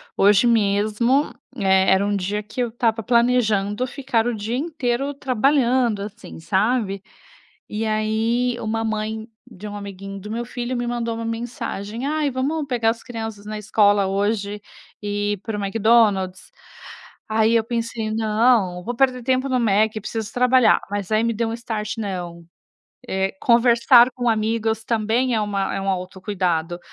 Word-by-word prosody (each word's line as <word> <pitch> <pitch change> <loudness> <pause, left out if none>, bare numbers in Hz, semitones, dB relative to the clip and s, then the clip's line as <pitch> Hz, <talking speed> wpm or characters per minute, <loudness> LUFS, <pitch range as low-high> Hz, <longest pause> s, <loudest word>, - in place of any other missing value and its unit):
Hoje 205 +4 +5
mesmo, 215 +5 +2 0.2
eh, 190 -2 +3
era 190 +1 +3
um 205 - 0
dia 200 +2 -2
que 215 +4 -5
eu 240 - 0
estava 225 -1 0
planejando 235 -2 +2
ficar 260 -3 -1
o 245 - 0
dia 220 +2 -3
inteiro 275 -3 -2
trabalhando, 255 -4 +1
assim, 210 -1 -9
sabe. 200 +2 0 0.7
E 215 +1 -3
aí, 220 +3 0
uma 225 +1 -2
mãe 220 +1 -3 0.2
de 210 -2 -12
um 205 - -7
amiguinho 195 0 -8
do 210 +2 -9
meu 235 +2 -3
filho 245 +1 -4
me 240 0 -2
mandou 235 -1 -2
uma 230 - -5
mensagem: 230 0 -5
"Ai, 300 -1 0
vamos 285 +4 -2
pegar 235 -4 +1
as 225 0 -2
crianças 225 -4 -7
na 215 0 -5
escola 205 -1 +3
hoje 205 +1 -1 0.4
e 205 0 -1
ir 205 - -4
pro 210 +2 -5
McDonald's?" 200 -2 +2 0.8
Aí 220 +1 +3
eu 225 - +3
pensei: 230 -1 -3
"Não, 220 -3 +2
não 180 - -8
vou 240 +4 -3
perder 255 -1 +1
tempo 260 +1 +1
no 255 - +1
Méqui, 215 -1 +2
preciso 220 +1 -5
trabalhar". 250 -1 +4
Mas 205 0 -3
aí 215 +1 +3
me 230 - +1
deu 225 +1 -2
start: 225 -2 -4
"Não, 175 -5 -5 0.6
eh 190 0 -1
conversar 235 +1 +5
com 245 -1 -1
amigos 220 0 0
também 230 +3 +1
é 215 - +1
uma 200 -2 -1
é - - -2
um 195 - -2
autocuidado. 180 -2 -2
220 Hz, 160 wpm, -22 LUFS, 205-240 Hz, 0.8 s, Hoje